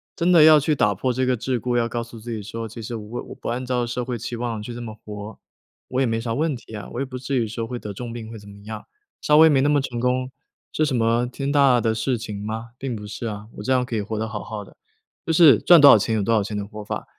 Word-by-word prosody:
真 175 0 +1
的 170 -3 +7
要 155 -1 +8
去 150 +2 +1
打 105 -6 +2
破 130 +7 -1
这 130 +1 0
个 125 -1 +1
桎 125 +2 -2
梏， 120 +1 -1
要 115 -1 +1
告 120 0 -2
诉 115 0 -12
自 120 +2 -8
己 110 -2 -4
说： 115 +2 -6
“其 115 +2 -9
实 115 +2 -5
我 110 +2 -6
我 - - -10
不 - - -6
按 125 +2 -3
照 125 -1 0
社 120 +1 -3
会 125 -1 -3
期 120 +2 -5
望 115 -3 -3
去 120 - -7
这 120 - -7
么 110 -2 -7
活， 105 0 -9 0.5
我 130 - -1
也 - - +3
没 115 0 -1
啥 115 -1 -3
问 150 +3 0
题 120 - -13
呀， 105 - -7
我 120 - -4
也 - - -1
不 130 -1 -7
至 130 +1 -2
于 115 - +1
说 115 +1 -4
会 125 +1 -4
得 105 -3 -7
重 120 +3 -7
病 115 -1 -7
会 115 - -8
怎 100 0 -14
么 100 - -13
样， 110 0 -7 0.4
稍 150 0 +4
微 160 0 +8
没 140 - +4
那 140 - +2
么 145 -1 +3
成 120 -3 -4
功， 125 +1 0 0.4
是 155 - +1
什 140 -4 -1
么， 115 +1 +2
天 135 +3 -4
大 135 -4 +4
的 115 -1 +1
事 120 +3 0
情 105 -3 -6
吗？ 110 +2 -5
并 130 -3 -3
不 105 -1 -8
是 115 +2 -5
啊， 105 -1 -6
我 - - -6
这 130 - +1
样 125 -1 +2
可 120 - -4
以 110 - 0
活 105 +2 -4
得 110 - -2
好 110 -2 -5
好 105 +1 -6
的。” - - -19 0.5
就 165 - +1
是， 155 -8 +7
赚 175 -3 +7
多 145 - +10
少 - - +8
钱 110 +2 0
有 105 - 0
多 115 - +1
少 110 - +3
钱 105 +1 -4
的 100 - -3
活 105 +1 -9
法， - - -5
120 Hz, 330 characters per minute, -23 LUFS, 110-130 Hz, 0.5 s, 多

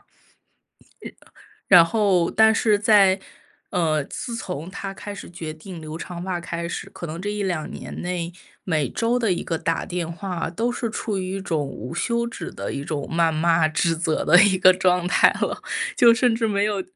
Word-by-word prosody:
日 - - -36 1.6
然 175 -3 +8
后 195 -3 +2
但 220 0 +5
是 215 -2 +2
在 200 -3 +5 0.5
呃， 160 -3 +1
自 235 - -6
从 180 -6 -5
他 195 0 -6
开 205 +1 -8
始 200 - -9
决 165 -3 -7
定 165 +1 -10
留 155 0 -7
长 175 +1 -7
发 185 -2 -2
开 170 0 -5
始， - - -5
可 - - -8
能 165 +1 -6
这 205 - -3
1-2 190 -6 -2
年 - - -8
内， 175 -1 -3 0.3
每 155 -6 0
周 235 +2 0
的 230 -3 +1
一 - - -4
个 165 - -2
打 165 +1 -2
电 175 -3 -4
话 175 -1 -4
都 225 +8 -1
是 245 -1 -3
处 215 -2 -3
于 185 0 -3
一 195 - -4
种 160 -6 -2
无 125 +2 -7
休 235 +6 0
止 235 - -6
的 - - -6
一 140 +1 -5
种 145 -3 -3
谩 165 0 +3
骂 165 0 +2
指 160 +2 +1
责 160 -1 -1
的 175 - +7
一 200 -2 +4
个 185 0 +7
状 180 -1 +2
态 180 - +5
了， - - -2 0.4
就 235 -1 +7
甚 245 0 +2
至 225 0 0
没 200 -1 +1
有 205 -2 0
180 Hz, 210 characters per minute, -23 LUFS, 165-205 Hz, 1.6 s, 然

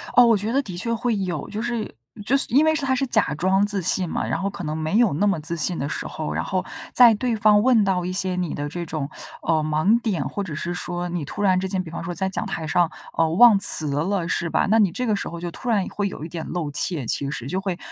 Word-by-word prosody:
哦， 245 - +8
我 230 -3 +4
觉 210 +3 -3
得 275 +3 +2
的 185 -9 -8
确 230 +6 -2
会 235 0 -1
有。 180 -6 -3
就 215 +1 -4
是 235 -2 -4 0.3
就 260 - +2
是 275 - 0
因 285 +6 +4
为 315 - +3
是 310 - -2
它 260 -1 +1
是 270 +1 0
假 220 - +1
装 190 +5 +2
自 205 -1 0
信 180 +1 +1
嘛， - - -2
然 165 - -2
后 200 - -1
可 200 -1 -8
能 155 -1 -3
没 160 +5 -1
有 235 -7 +3
那 200 +8 +1
么 195 -5 +1
自 170 +3 -4
信 170 +2 0
的 140 - -2
时 - - -4
候， 155 - -5
然 - - -2
后 185 -1 -2 0.3
在 240 -2 +7
对 235 +2 -1
方 210 -1 +4
问 240 -3 +4
到 190 -2 0
一 180 - -3
些 185 0 -1
你 180 -3 -2
的 145 0 -4
这 175 +3 -5
种， 155 -4 -3 0.4
呃， 160 -1 +1
盲 155 +10 +2
点， 185 - -1
或 200 - -4
者 160 -5 -6
是 175 +3 -4
说 175 0 -4
你 175 -3 -3
突 205 - -5
然 185 -2 +3
之 190 0 -3
间， 185 -1 -1
比 165 - -10
方 170 - -6
说 175 +1 -5
在 190 +1 -1
讲 190 - -3
台 160 - -4
上， 165 +2 +2 0.3
呃， 165 -1 +2
忘 210 +5 +6
词 160 -5 +6
了， 170 +4 -1
是 170 0 -1
吧？ - - +1
那 220 +2 +3
你 200 -5 +3
这 250 +8 -3
个 215 - +1
时 - - -4
候， 170 - -7
就 175 0 -5
突 245 - -6
然 205 -5 +2
会 205 -1 -2
有 155 - -8
一 - - -8
点 165 -1 -5
露 165 -5 -3
怯 145 -2 0
其 140 +4 -1
实， 130 -4 -5
就 185 +7 -2
会 190 -3 -3
185 Hz, 310 characters per minute, -23 LUFS, 165-215 Hz, 0.4 s, 哦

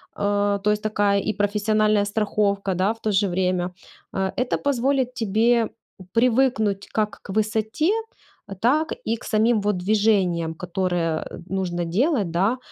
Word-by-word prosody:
э, 205 0 +1
то 210 - +3
есть 210 0 -1
такая 205 -2 +2
и 215 - -1
профессиональная 210 +1 +1
страховка, 205 -2 0
да, 185 +3 +1
в 225 - -20
то 215 - 0
же 200 0 +2
время. 180 0 0 0.4
Э, 190 -1 -1
это 250 0 0
позволит 265 -2 0
тебе 225 +1 +2 0.4
привыкнуть 230 -4 +2
как 215 -1 -1
к - - -9
высоте, 220 - 0 0.7
так 305 +7 +2
и 225 - 0
к - - -16
самим 220 +1 +2
вот 205 -1 0
движениям, 185 -4 +1
которые, 175 -2 -1
э, - - -9
нужно 180 -3 -2
делать, 210 - +1
да, 195 +9 +1
210 Hz, 145 wpm, -23 LUFS, 190-225 Hz, 0.7 s, то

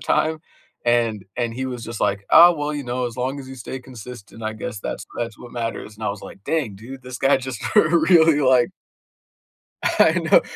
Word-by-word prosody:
time, 160 0 +1 0.5
and 115 -4 +1
and 120 -2 -1
he 130 +2 -3
was 125 -2 -5
just 115 -1 -7
like, 100 0 0
"Oh 175 +1 +9
well, 150 -1 -2
you 145 -1 -4
know, 125 +1 -2
as 120 - -7
long 130 +3 -2
as 130 - -10
you 135 - -9
stay 130 +2 -7
consistent, 120 -3 -11
I 110 - -2
guess 110 0 -6
that's - - -5
that's 115 -2 -3
what 120 - -11
matters," 115 -2 -5
and 110 - -7
I - - +1
was 100 0 -7
like, 100 - -12
"Dang, 140 -11 -1
dude, 130 +6 -10
this 125 0 -7
guy 135 +1 +4
just 130 -3 -6 0.2
really 165 -1 +5
like" 130 -3 +4 1.1
I - - +4
know, - - +4
125 Hz, 205 wpm, -22 LUFS, 115-135 Hz, 1.1 s, Oh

